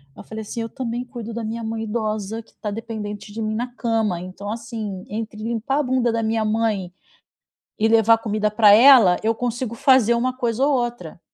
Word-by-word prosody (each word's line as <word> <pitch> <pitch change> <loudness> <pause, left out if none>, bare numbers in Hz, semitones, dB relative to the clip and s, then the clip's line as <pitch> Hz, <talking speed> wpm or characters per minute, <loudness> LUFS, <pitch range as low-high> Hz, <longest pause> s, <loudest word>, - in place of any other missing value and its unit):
eu - - -11
falei 220 0 -7
assim: 230 +2 -5
"Eu 225 - -4
também 240 -1 -4
cuido 235 -2 -8
da 235 0 -4
minha 230 +1 -4
mãe 225 0 -3
idosa 215 0 -3
que - - -27
tá 210 - -4
dependente 210 -2 -6
de 225 - -5
mim 215 0 -2
na 245 +3 -2
cama, 225 -7 0
então 190 +3 -7
assim 220 -4 -6
entre 215 0 -5
limpar 235 +5 -1
a - - +1
bunda 250 -2 +1
da 230 0 -1
minha 220 0 0
mãe 215 -5 -1 0.9
e 220 - +3
levar 225 0 +5
comida 215 -1 -1
pra 210 -1 +6
ela 230 -7 +7
eu 225 +1 +1
consigo 245 0 -3
fazer 240 -2 +4
uma 255 +2 -1
coisa 245 0 0
ou 295 - +2
outra." 240 -10 -3
225 Hz, 200 wpm, -22 LUFS, 215-235 Hz, 0.9 s, ela